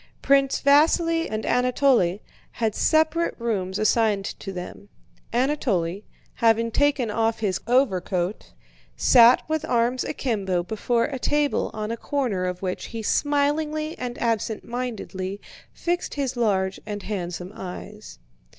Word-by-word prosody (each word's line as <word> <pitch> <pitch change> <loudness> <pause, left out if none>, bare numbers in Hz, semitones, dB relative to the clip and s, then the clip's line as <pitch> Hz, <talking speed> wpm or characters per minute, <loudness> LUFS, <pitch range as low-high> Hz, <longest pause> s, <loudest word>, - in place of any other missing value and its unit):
Prince 275 -1 +3
Vasíli 330 +3 +4
and 215 0 -3
Anatole 250 -7 +2 0.3
had 225 -3 -1
separate 315 +5 +2
rooms 200 -5 -2
assigned 215 -2 +2
to 195 - -6
them. 185 +2 -8 0.4
Anatole, 225 - 0 0.3
having 230 0 +2
taken 280 -4 +1
off 225 +1 0
his 195 -4 -1
overcoat, 195 -6 0 0.5
sat 240 0 +6
with 315 0 -1
arms 240 +2 +1
akimbo 195 -11 -1
before 225 +5 0
a 270 -3 -3
table 295 +2 +1
on 215 0 -3
a 230 - -3
corner 235 -10 -1
of 180 +1 -4
which 185 -1 -3
he 225 -1 -6
smilingly 300 +4 0
and 245 -1 -4
absent 225 -2 -1
mindedly 210 -6 -5 0.3
fixed 350 +1 -2
his 275 -3 -2
large 195 -5 0
and 205 -1 -5
handsome 180 -2 -5
eyes. - - -9
230 Hz, 125 wpm, -24 LUFS, 195-275 Hz, 0.5 s, sat